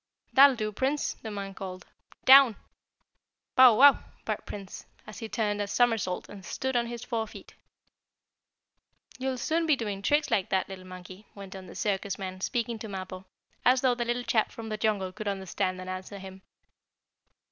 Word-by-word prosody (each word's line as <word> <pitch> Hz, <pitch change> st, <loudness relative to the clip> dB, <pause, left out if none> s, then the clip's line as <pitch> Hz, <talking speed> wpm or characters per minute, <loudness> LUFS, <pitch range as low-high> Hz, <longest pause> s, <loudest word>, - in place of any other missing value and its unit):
"That'll 275 Hz, 0 st, +8 dB
do, 215 Hz, -2 st, -3 dB
Prince!" 270 Hz, +7 st, -1 dB
the 220 Hz, -, -6 dB
man 200 Hz, -2 st, -5 dB
called. 185 Hz, -2 st, -8 dB, 0.4 s
"Down!" 265 Hz, -4 st, +8 dB, 1.0 s
"Bow 255 Hz, -3 st, +8 dB
wow!" 280 Hz, +4 st, +7 dB, 0.3 s
barked -, -, -3 dB
Prince, 205 Hz, +1 st, -8 dB, 0.2 s
as 215 Hz, -, -10 dB
he 225 Hz, -2 st, -6 dB
turned 210 Hz, -3 st, -1 dB
a 205 Hz, -, -2 dB
somersault, 225 Hz, -5 st, +1 dB
and 200 Hz, -2 st, -11 dB
stood 265 Hz, +8 st, -3 dB
on 235 Hz, -1 st, +1 dB
his 235 Hz, 0 st, -6 dB
four 225 Hz, -3 st, -2 dB
feet. -, -, -13 dB, 1.7 s
"You'll 260 Hz, 0 st, -2 dB
soon 325 Hz, +6 st, 0 dB
be 310 Hz, -, +5 dB
doing 205 Hz, -6 st, -4 dB
tricks 295 Hz, +8 st, +1 dB
like 190 Hz, -, +1 dB
that, 190 Hz, -1 st, +1 dB
little 185 Hz, -1 st, -10 dB
monkey," 185 Hz, +2 st, -11 dB
went 195 Hz, -1 st, -9 dB
on 190 Hz, -1 st, -9 dB
the -, -, -11 dB
circus 200 Hz, -2 st, -2 dB
man, 185 Hz, -1 st, -6 dB
speaking 235 Hz, +1 st, -2 dB
to 220 Hz, -, -6 dB
Mappo, 185 Hz, -1 st, -7 dB, 0.4 s
as 250 Hz, +1 st, +4 dB
though 255 Hz, -2 st, +3 dB
the 240 Hz, 0 st, -2 dB
little 240 Hz, +1 st, -1 dB
chap 220 Hz, -2 st, +1 dB
from 225 Hz, -1 st, -8 dB
the 215 Hz, -, -2 dB
jungle 205 Hz, -4 st, 0 dB
could 210 Hz, +3 st, -7 dB
understand 190 Hz, -1 st, -2 dB
and 185 Hz, -, -8 dB
answer 185 Hz, +2 st, -6 dB
him. 190 Hz, 0 st, -10 dB
210 Hz, 180 wpm, -28 LUFS, 190-240 Hz, 1.7 s, That'll